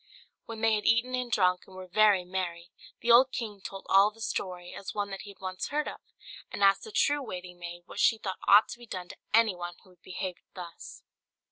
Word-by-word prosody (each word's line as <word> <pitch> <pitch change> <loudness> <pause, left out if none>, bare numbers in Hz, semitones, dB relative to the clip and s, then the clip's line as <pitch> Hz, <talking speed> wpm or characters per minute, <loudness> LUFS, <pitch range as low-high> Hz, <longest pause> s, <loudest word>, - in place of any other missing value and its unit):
When 225 -1 -7
they 225 -1 +4
had 210 -1 0
eaten 235 +3 +3
and 250 -1 -2
drunk, 180 -4 +2
and 190 - -14
were 185 0 -8
very 195 0 +4
merry, 175 -1 -4 0.3
the 235 - +2
old 255 +3 +7
king 210 -5 -5
told 195 0 -8
all 195 +2 +6
the 220 +1 -20
story, 180 -5 -4
as 195 - -7
one 205 -1 -2
that 195 - -5
he 205 - -10
had 200 - -14
once 185 -1 -4
heard 300 +1 -1
of, - - -7 0.5
and 200 - -2
asked 195 0 +4
the 440 - -9
true 290 -7 +2
waiting 180 -7 -8
maid 175 0 -8
what 200 - -9
she 225 - +4
thought 190 -4 -5
ought 205 +2 +8
to 240 - -8
be 240 - -13
done 180 -3 -6
to - - -10
anyone 185 -6 +2
who 185 - -20
would 180 -1 -25
behave 185 -1 -5 0.2
thus. 175 -3 -10
195 Hz, 230 wpm, -29 LUFS, 180-225 Hz, 0.5 s, ought